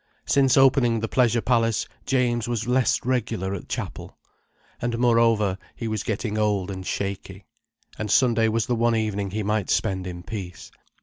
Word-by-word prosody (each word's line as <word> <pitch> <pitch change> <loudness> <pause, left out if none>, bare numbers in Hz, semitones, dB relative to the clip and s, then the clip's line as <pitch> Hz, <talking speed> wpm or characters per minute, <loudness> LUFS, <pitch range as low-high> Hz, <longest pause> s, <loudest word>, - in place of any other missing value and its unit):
Since 135 -2 +3
opening 130 -3 +4
the 110 - -2
Pleasure 120 -1 +2
Palace 115 -3 +1 0.2
James 125 -3 +1
was 120 -1 -2
less 125 0 +2
regular 115 -6 -1
at 100 - -7
Chapel. - - -6 0.6
And 120 -1 -1
moreover, 115 -5 +3 0.2
he 115 - -5
was 110 -2 -2
getting 110 0 -2
old 100 -3 0
and 95 -1 -6
shaky, 95 0 -5 0.5
and 105 - -3
Sunday 115 +1 +3
was 110 0 0
the 125 - -1
one 115 0 +2
evening 105 -3 -1
he 105 +2 -3
might 105 -1 -1
spend 95 -3 0
in 90 -1 -7
peace. 95 -4 -7
110 Hz, 165 wpm, -24 LUFS, 100-120 Hz, 0.6 s, opening